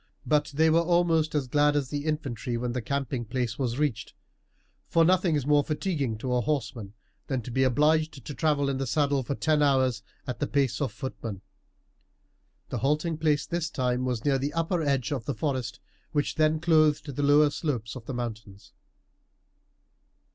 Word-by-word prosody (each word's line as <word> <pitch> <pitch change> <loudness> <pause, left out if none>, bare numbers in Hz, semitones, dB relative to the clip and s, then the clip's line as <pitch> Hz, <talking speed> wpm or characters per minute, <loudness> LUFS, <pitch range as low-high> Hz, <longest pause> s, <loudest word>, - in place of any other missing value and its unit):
But 150 -1 +2
they 160 +2 +4
were 165 +1 +4
almost 170 -2 +2
as 145 -3 +1
glad 145 +3 +2
as 140 -3 0
the 145 +1 -3
infantry 135 -6 -2
when 120 +1 -2
the 125 +1 -2
camping 135 0 -2
place 120 0 -3
was 125 -2 -1
reached, 130 -6 -2 0.7
for 165 -1 +4
nothing 180 -2 +3
is 145 -3 -1
more 145 0 +4
fatiguing 150 - -2
to 125 +3 -3
a 125 - +2
horseman 115 -7 -3 0.3
than 130 -4 -2
to 125 - -7
be 130 - 0
obliged 150 +2 +2
to 145 - -5
travel 145 +1 +1
in 135 -1 -1
the 135 - -2
saddle 140 +1 +1
for 140 +2 -3
ten 155 0 +1
hours 130 -5 +2 0.2
at 125 - -5
the 145 - -1
pace 140 -1 0
of 135 -5 0
footmen. 110 -3 -6 1.3
The - - -3
halting 155 +3 0
place 150 -3 +1
this 170 -1 -2
time 125 -3 -1
was 125 -2 -2
near 135 -2 +2
the 140 +2 -2
upper 165 +1 0
edge 140 -4 0
of 130 -6 -3
the 140 - -2
forest 125 -3 -2 0.3
which 145 -1 0
then 155 0 +2
clothed 155 -2 +3
the 145 - -2
lower 145 +1 +5
slopes 125 -9 -3
of 120 -3 -10
the 135 - -4
mountains. 110 -4 -7
140 Hz, 185 wpm, -27 LUFS, 125-155 Hz, 1.3 s, lower